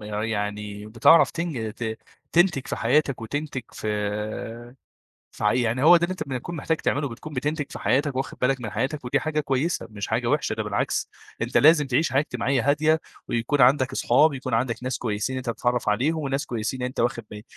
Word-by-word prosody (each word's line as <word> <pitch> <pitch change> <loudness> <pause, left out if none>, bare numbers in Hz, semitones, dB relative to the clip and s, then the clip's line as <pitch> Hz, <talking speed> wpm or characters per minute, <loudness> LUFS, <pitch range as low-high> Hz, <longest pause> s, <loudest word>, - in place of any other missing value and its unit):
يعني 105 -1 -3
بتعرف 115 +9 +5
تنج 150 -11 -3
ت 110 -1 -4 0.3
تنتج 170 -6 +3
في - - -3
حياتك 140 +1 +1
وتنتج 145 +3 -4
في 110 +3 -4 0.6
في - - -6
عي 105 +4 +3
يعني 120 +3 0
هو 175 +3 +8
ده 170 - 0
اللي 185 - -1
أنت 185 - -6
بتكون 135 +6 -4
محتاج 160 +2 0
تعمله 145 -2 -1
بتكون 140 +6 -9
بتنتج 145 +3 -1
في - - -7
حياتك 140 +1 +1
وواخد 130 +1 -4
بالك 130 0 +1
من 110 -4 -5
حياتك، 130 +6 -2
ودي 130 +2 +1
حاجة 155 +1 -1
كويسة، 145 +4 -1
مش 100 -3 -5
حاجة - - 0
وحشة، - - +1
ده - - -2
بالعكس، - - -1 0.3
أنت - - -2
لازم 150 -1 +6
تعيش 135 +1 +1
حياة 135 - +4
اجتماعية 130 -1 -1
هادية، 155 +2 +2 0.3
ويكون 120 +5 0
عندك 130 0 +4
أصحاب، 140 +4 +3
يكون 130 -3 -3
عندك 120 +1 -1
ناس 130 0 -2
كويسين 110 +3 -2
أنت 130 -2 -3
بتتعرّف 120 0 -1
عليهم، 135 +10 +1
وناس 135 +2 -2
كويسين 120 +2 -3
أنت 125 +1 -3
واخد 115 -1 0
با 105 0 -8
130 Hz, 190 wpm, -25 LUFS, 115-145 Hz, 0.6 s, هو